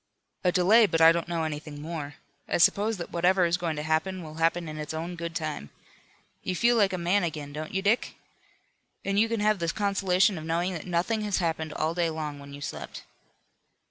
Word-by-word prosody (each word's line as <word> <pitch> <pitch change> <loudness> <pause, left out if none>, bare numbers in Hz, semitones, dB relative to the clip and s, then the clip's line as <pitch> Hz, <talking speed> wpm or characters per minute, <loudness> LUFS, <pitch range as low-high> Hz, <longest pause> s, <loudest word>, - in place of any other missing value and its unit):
"A 180 - +3
delay, 205 +5 +5
but 165 - 0
I 165 0 +8
don't 170 0 -1
know 170 -1 -1
anything 150 -1 -5
more. 150 -2 -6 0.3
I - - +1
suppose 205 +5 +3
that 170 - -7
whatever 180 +1 +3
is 170 0 +2
going 170 -3 -2
to 150 - -4
happen 165 +4 -1
will 155 -1 -9
happen 165 +1 +1
in 155 0 -6
its 150 +1 -5
own 170 +3 -4
good 170 0 -6
time. 155 - -4 0.7
You 185 - -3
feel 240 +5 +3
like 200 -4 +3
a 185 - -2
man 180 +3 +1
again, 150 -4 -4
don't 155 +1 -5
you 190 0 -2
Dick? 215 +4 +1 0.9
And 200 0 +1
you 225 +1 +3
can 230 -2 -1
have 210 -1 +2
the 170 -1 -1
consolation 195 -1 +2
of - - -8
knowing 170 +3 -1
that 165 0 -6
nothing 180 +6 0
has 205 -2 0
happened 160 -2 -1
all 155 +2 -1
day 170 -1 +1
long 155 -2 -5
when 140 0 -11
you 140 0 -9
slept." - - -6
170 Hz, 215 wpm, -27 LUFS, 155-190 Hz, 0.9 s, I